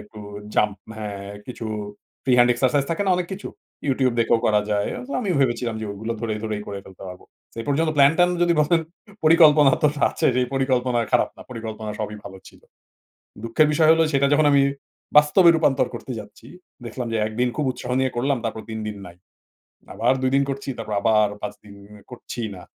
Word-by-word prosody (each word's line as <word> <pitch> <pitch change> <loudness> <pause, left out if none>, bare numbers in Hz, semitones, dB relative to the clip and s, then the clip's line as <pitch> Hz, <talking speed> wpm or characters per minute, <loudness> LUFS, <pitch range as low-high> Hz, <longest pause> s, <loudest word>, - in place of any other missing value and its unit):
একটু 105 0 -13 0.3
জাম্প 105 -2 +1 0.2
হ্যাঁ? 100 -2 -6 0.2
কিছু 120 -3 -7 0.6
ফ্রি 130 - +1
হ্যান্ড 120 0 +5
এক্সারসাইজ 130 +3 +1
থাকে 165 +5 0
না - - +3
অনেক 180 -1 -2
কিছু। 195 +2 -6 0.4
YouTube 130 -2 +1
দেখেও 115 0 +3
করা 105 -1 +3
যায়। 105 0 0
অন্ত 255 - -9
আমি 205 -6 -2
ভেবেছিলাম 120 -3 0
যে 110 - -4
ওগুলো 110 +3 -4
ধরে 110 -2 -2
ধরেই 105 -1 -3
করে 100 -1 -5
ফেলতে 95 0 -14
পারব। 90 - -10 0.4
এ - - -4
পর্যন্ত 155 +3 +1
প্ল্যান 140 +1 +6
ট্যান 175 0 +5
যদি 175 0 +3
বলেন 165 +2 +3 0.4
পরিকল্পনা 155 -3 +6
তো 150 - +5 0.2
আছে - - -1
সেই 125 0 +2
পরিকল্পনা 130 -2 +1
খারাপ - - +3
না - - -11
পরিকল্পনা 110 -2 -6
সবই 105 0 -4
ভালো 95 -1 -10
ছিল। - - -20 0.8
দুঃখের 115 +7 +3
বিষয় 155 0 +3
হলো 165 0 +3
সেটা 140 0 +3
যখন 150 0 +3
আমি 140 -1 +5 0.6
বাস্তবে 150 +5 +5
রূপান্তর 160 -5 +2
করতে 130 - -7
যাচ্ছি। 105 +2 -15 0.4
দেখলাম 120 +1 -5
যে - - 0
১ 110 - -6
দিন 125 - +3
খুব 150 - -1
উৎসাহ 125 0 -8
নিয়ে 130 0 +1
করলাম 135 +2 0
তারপর 110 -1 -4
৩ 110 - -4
দিন 105 -1 -5
নাই। 85 - -13 0.8
আবার 120 +3 +2
২ 130 0 +1
দিন 140 - +3
করছি 135 0 -4
তারপর 110 -2 -5
আবার 110 0 +3
৫ - - -4
দিন 100 - -13 0.4
করছি 120 0 -7
না। 90 - -11
125 Hz, 195 wpm, -22 LUFS, 110-145 Hz, 0.8 s, প্ল্যান